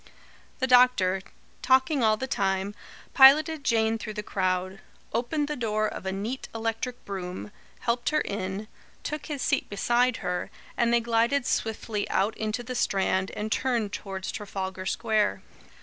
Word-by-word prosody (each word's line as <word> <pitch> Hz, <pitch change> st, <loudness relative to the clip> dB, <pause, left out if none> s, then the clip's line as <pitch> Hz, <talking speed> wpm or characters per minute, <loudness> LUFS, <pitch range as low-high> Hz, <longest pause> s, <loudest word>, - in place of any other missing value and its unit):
The 260 Hz, -, 0 dB
doctor, 250 Hz, -7 st, +4 dB, 0.4 s
talking 260 Hz, +2 st, +3 dB
all 215 Hz, -1 st, +4 dB
the 260 Hz, -, -3 dB
time, 195 Hz, -4 st, -1 dB, 0.4 s
piloted 295 Hz, +3 st, +7 dB
Jane 225 Hz, -3 st, +2 dB
through 215 Hz, -1 st, -6 dB
the 210 Hz, -, -4 dB
crowd; 185 Hz, -1 st, -1 dB, 0.3 s
opened 285 Hz, +6 st, 0 dB
the 300 Hz, -, -2 dB
door 215 Hz, -3 st, 0 dB
of 190 Hz, -, -6 dB
a -, -, 0 dB
neat 215 Hz, +7 st, -4 dB
electric 225 Hz, +2 st, -3 dB
brougham, 190 Hz, 0 st, -6 dB, 0.3 s
helped 240 Hz, 0 st, 0 dB
her 305 Hz, 0 st, +2 dB
in, 200 Hz, +1 st, -4 dB, 0.4 s
took 300 Hz, 0 st, -4 dB
his 290 Hz, -3 st, -3 dB
seat -, -, 0 dB
beside 240 Hz, +4 st, +2 dB
her, 180 Hz, 0 st, -2 dB, 0.3 s
and 235 Hz, 0 st, +2 dB
they 235 Hz, 0 st, +4 dB
glided 235 Hz, +4 st, +1 dB
swiftly 220 Hz, -1 st, -2 dB
out 200 Hz, +3 st, +1 dB
into 220 Hz, +3 st, -3 dB
the 255 Hz, +1 st, -5 dB
Strand, 190 Hz, -4 st, +1 dB
and 215 Hz, +1 st, -4 dB
turned 235 Hz, -6 st, 0 dB
towards 190 Hz, -1 st, -5 dB
Trafalgar 190 Hz, -4 st, -5 dB
Square. 220 Hz, -2 st, 0 dB
220 Hz, 150 wpm, -27 LUFS, 195-250 Hz, 0.4 s, piloted